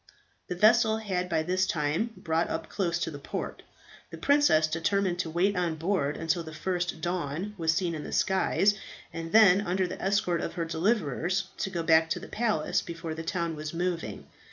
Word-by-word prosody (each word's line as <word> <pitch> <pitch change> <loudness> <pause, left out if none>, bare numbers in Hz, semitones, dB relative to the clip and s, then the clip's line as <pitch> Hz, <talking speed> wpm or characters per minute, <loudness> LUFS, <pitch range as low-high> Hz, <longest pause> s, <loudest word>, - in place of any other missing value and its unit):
The 180 - -3
vessel 220 +3 +5
had 185 -5 -2
by 160 -2 +1
this 185 +3 +1
time 155 +8 0
brought 165 0 0
up 160 0 -4
close 175 -4 -1
to 170 -1 -2
the 145 - -8
port. - - -5 0.5
The - - -8
princess 285 - +4
determined 175 +3 0
to 170 - -1
wait 185 +5 +1
on 175 -3 0
board 160 -4 -1
until 165 +1 0
the 160 -2 -9
first 175 -2 -2
dawn 175 +2 -3
was 165 -4 +1
seen 170 +1 0
in 155 -2 -5
the - - -7
skies, 190 +1 +2 0.4
and 165 0 -5
then 200 -3 +7
under 190 -1 0
the 180 - -6
escort 190 -4 +1
of - - -4
her 170 -2 -2
deliverers 175 - 0
to - - -1
go 170 -3 -3
back 160 0 +4
to - - -1
the - - -10
palace, 215 -9 0
before 165 -1 -6
the 160 - -5
town 170 -1 -2
was 155 +1 -6
moving. 175 -1 -3
175 Hz, 195 wpm, -28 LUFS, 160-190 Hz, 0.5 s, then